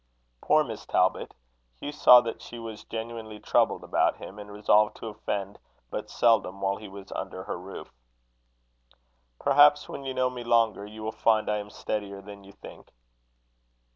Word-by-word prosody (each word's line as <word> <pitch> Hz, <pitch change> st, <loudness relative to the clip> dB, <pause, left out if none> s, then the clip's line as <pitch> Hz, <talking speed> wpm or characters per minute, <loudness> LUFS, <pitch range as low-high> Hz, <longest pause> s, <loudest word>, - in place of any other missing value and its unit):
Poor 155 Hz, 0 st, +4 dB
Miss 115 Hz, -6 st, -7 dB
Talbot! 90 Hz, 0 st, +1 dB, 0.4 s
Hugh 145 Hz, -, -5 dB
saw 125 Hz, -4 st, +8 dB
that 115 Hz, -2 st, -5 dB
she 120 Hz, -, -9 dB
was 115 Hz, -2 st, -8 dB
genuinely 110 Hz, -1 st, -6 dB
troubled -, -, +1 dB
about -, -, +1 dB
him, 105 Hz, -, -10 dB
and 105 Hz, 0 st, -10 dB
resolved 105 Hz, +1 st, +3 dB
to 115 Hz, -, -6 dB
offend 100 Hz, -1 st, -4 dB, 0.3 s
but -, -, -5 dB
seldom, 110 Hz, -5 st, +2 dB
while 100 Hz, 0 st, 0 dB
he 110 Hz, -, -10 dB
was 100 Hz, 0 st, -11 dB
under -, -, -5 dB
her -, -, -5 dB
roof. -, -, -10 dB, 1.5 s
"Perhaps, 145 Hz, +1 st, +5 dB
when -, -, -7 dB
you 130 Hz, -1 st, -4 dB
know 130 Hz, 0 st, +1 dB
me 125 Hz, -1 st, -7 dB
longer, 115 Hz, -4 st, +2 dB
you 110 Hz, +1 st, -10 dB
will 110 Hz, -, -2 dB
find 110 Hz, -1 st, +2 dB
I 105 Hz, -, +1 dB
am 105 Hz, 0 st, -8 dB
steadier 100 Hz, -2 st, -4 dB
than 100 Hz, 0 st, -11 dB
you 100 Hz, -, -14 dB
think." -, -, -13 dB
110 Hz, 170 wpm, -27 LUFS, 100-120 Hz, 1.5 s, saw